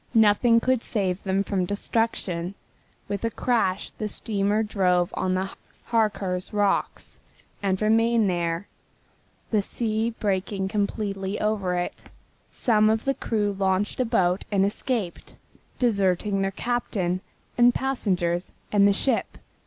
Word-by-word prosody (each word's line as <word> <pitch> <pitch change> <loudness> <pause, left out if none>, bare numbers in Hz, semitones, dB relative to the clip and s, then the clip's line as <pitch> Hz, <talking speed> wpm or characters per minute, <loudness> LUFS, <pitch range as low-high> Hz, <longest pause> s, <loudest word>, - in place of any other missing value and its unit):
Nothing 225 +2 +5
could 255 0 +1
save 195 -6 -1
them 195 0 0
from 195 -2 -1
destruction. 200 -4 -1 0.5
With 200 +1 -3
a 230 - +1
crash 220 -6 0
the 215 - -4
steamer 205 0 0
drove 180 -4 +1
on 185 0 0
the 190 +1 -2 0.4
Harcars 200 -5 0
rocks 205 -1 -1 0.4
and 190 -2 0
remained 225 0 +3
there, 170 0 -1 0.8
the 215 -2 +3
seas 225 +2 -2
breaking 195 -1 -1
completely 200 -1 -2
over 205 -4 0
it. 175 0 -3 0.4
Some 215 -3 +2
of 220 +1 0
the 275 - +2
crew 210 -5 -1
launched 195 +2 0
a 255 - +2
boat 180 -4 +1
and 195 -1 +3
escaped, 205 -2 -3 0.4
deserting 200 -3 +1
their 195 - +1
captain, 195 -4 -1 0.3
the 240 0 +6
passengers 185 -10 -1 0.2
and 200 -1 +5
the 200 - +4
ship. 235 +4 0
205 Hz, 130 wpm, -25 LUFS, 190-225 Hz, 0.8 s, the